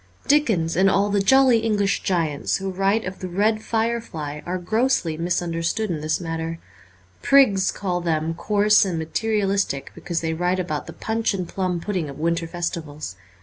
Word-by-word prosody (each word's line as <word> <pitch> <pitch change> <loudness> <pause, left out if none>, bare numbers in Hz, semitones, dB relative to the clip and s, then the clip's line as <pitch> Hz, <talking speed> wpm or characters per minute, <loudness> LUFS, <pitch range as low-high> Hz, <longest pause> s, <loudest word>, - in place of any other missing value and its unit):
Dickens 220 - +2
and 190 +3 +4
all 200 +1 +2
the 205 - +2
jolly 260 +2 +5
English 210 -3 0
giants 165 -6 0
who 195 0 -4
write 195 +4 +1
of 185 +1 -6
the 185 - -4
red 210 +4 +1
firelight 220 -11 -2
are 180 +1 -1
grossly 215 -2 0
mis 175 +2 -1
understood 170 +5 -1
in 155 -3 -3
this 155 +1 0
matter. 165 -1 -4 0.6
Prigs 210 -9 +4
call 180 -3 -2
them 160 -1 0
coarse 210 +4 +3
and 185 -4 -2
materialistic 195 -2 -1
because 170 -2 -3
they 160 -1 -1
write 180 +3 0
about 155 -5 -3
the - - -8
punch 220 -1 -1
and 185 -3 -3
plum 180 -2 -2
pudding 180 -4 -3
of 140 - -9
winter 165 +1 -1
festivals. 160 - -5
185 Hz, 170 wpm, -23 LUFS, 165-210 Hz, 0.6 s, jolly